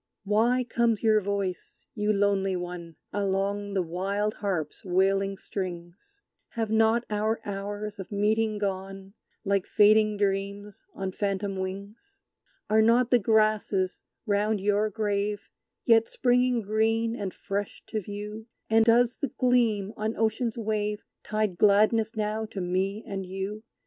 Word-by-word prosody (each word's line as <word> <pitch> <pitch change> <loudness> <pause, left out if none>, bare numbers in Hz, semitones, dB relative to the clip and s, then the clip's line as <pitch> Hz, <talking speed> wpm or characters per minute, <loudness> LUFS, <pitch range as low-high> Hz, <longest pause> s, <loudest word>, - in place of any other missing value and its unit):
Why 230 +5 +2
comes 235 -2 0
your 215 -1 +4
voice, 200 -2 -4
you 210 -1 0
lonely 200 -2 +1
One, 175 -2 -6 0.2
Along 200 0 -1
the 190 - +2
wild 195 +5 -2
harp's 180 -8 -3
wailing 195 +1 +1
strings? 185 - -7 0.3
Have 225 -2 -2
not 225 +2 +3
our 215 +2 0
hours 205 +1 -5
of 190 - -8
meeting 215 +1 +1
gone, 195 -1 -4 0.3
Like 200 -1 +1
fading 215 0 +4
dreams 200 0 -2
on 190 -1 -3
phantom 200 0 -2
wings? 200 - -7 0.4
Are 215 +1 +4
not 235 +2 +3
the 245 - +6
grasses 215 -3 +1 0.2
round 210 0 +1
your 205 +2 +1
grave 205 -1 -2 0.3
Yet 225 -1 +5
springing 250 -1 +2
green 225 +2 +1
and 200 -5 -4
fresh 200 +2 -5
to 215 - -2
view? 210 +3 -7 0.2
And 225 0 +6
does 240 +1 +4
the 285 - -2
gleam 230 -6 +1
on 215 +1 -2
Ocean's 225 +1 0
wave 210 -2 -2 0.2
Tide 215 -4 -1
gladness 215 +2 +4
now 215 +1 -2
to 215 - -7
me 190 +4 -1
and 195 -1 -4
you? 195 +3 -5
210 Hz, 135 wpm, -27 LUFS, 195-220 Hz, 0.4 s, the